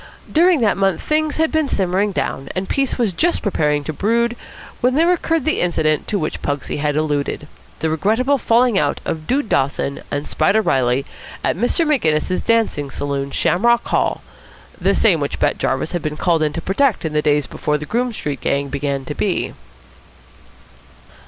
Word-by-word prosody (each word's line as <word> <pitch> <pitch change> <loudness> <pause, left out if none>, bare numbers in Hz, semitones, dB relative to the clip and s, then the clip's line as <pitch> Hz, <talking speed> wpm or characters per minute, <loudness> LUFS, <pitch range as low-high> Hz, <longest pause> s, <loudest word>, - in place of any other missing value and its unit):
During 340 -2 +4
that 215 -3 +2
month 195 -3 +1
things 305 -1 0
had 320 0 +1
been 315 -3 +1
simmering 190 +2 +1
down, 135 -7 -3
and 185 +1 -2
peace 275 -1 0
was 225 -6 0
just 345 - +1
preparing 150 -7 +1
to 155 - -4
brood 235 +8 +1 0.4
when 250 +1 +2
there 335 +4 +4
occurred 330 -4 -1
the 315 - +1
incident 155 -3 +1
to 210 - 0
which 155 -5 -3
Pugsy 145 -2 -3
had 145 0 -1
alluded, 150 -1 -1 0.3
the 160 - +1
regrettable 225 - +1
falling 235 -3 +3
out 145 - 0
of 155 -1 -4
Dude 265 -1 0
Dawson 140 -1 0
and 145 +1 -3
Spider 215 - +2
Reilly 130 -2 +1 0.4
at - - +1
Mr. 245 - +1
Maginnis's 185 - +1
dancing 225 -11 +1
saloon, 140 0 -3
Shamrock 235 +11 +2
Hall, - - 0 0.6
the - - +2
same - - +4
which - - -3
Bat - - 0
Jarvis - - -1
had 175 - -2
been 150 0 -4
called 170 -1 +1
in 150 -1 +1
to 165 - -4
protect 235 -1 +1
in 155 - -2
the 150 - +2
days 145 -1 +2
before 150 0 -2
the 150 - -7
Groome 245 +7 -1
Street 145 - -4
gang 140 0 -1
began 140 -1 -2
to 145 - -4
be. 190 +3 -1
180 Hz, 180 wpm, -19 LUFS, 150-240 Hz, 0.6 s, During